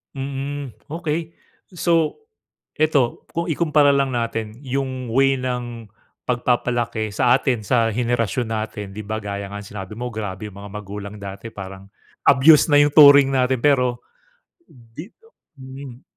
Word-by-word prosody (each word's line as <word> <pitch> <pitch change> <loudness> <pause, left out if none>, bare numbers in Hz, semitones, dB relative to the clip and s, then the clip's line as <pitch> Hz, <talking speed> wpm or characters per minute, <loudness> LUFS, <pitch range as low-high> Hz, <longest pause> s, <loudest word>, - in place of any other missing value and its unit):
Mm, 140 -1 -5 0.2
okey. 165 0 -3 0.4
So 165 - +1 0.6
eto, 145 -6 +1
kung 170 +1 -2
ikumpara 150 -3 +3
lang 135 -1 +1
natin 115 -1 -3
yung 130 -2 -3
way 135 +2 +3
ng 120 -3 -4 0.4
pagpapalaki 120 -3 0
sa 125 +1 +4
atin 125 -5 -1
sa 115 0 +2
henerasyon 120 0 -1
natin. 110 -1 -4
'Di 105 +2 -7
ba 110 0 -2
gaya 100 0 -4
nga 100 +1 -7
ng - - -12
sinabi 95 0 -7
mo, 125 +1 -5
grabe 105 -2 -6
yung 100 - -12
mga 100 0 -10
magulang 105 0 -7
dati 100 +2 -8
parang 95 0 -9 0.4
abuse 150 +5 +6
na 145 - +5
yung 145 0 +4
turing 140 -2 +8
natin, 130 0 +2
pero 125 -4 +2 0.6
di 120 +5 -12 0.5
hmm. 130 -1 -10
125 Hz, 140 wpm, -21 LUFS, 110-140 Hz, 0.6 s, turing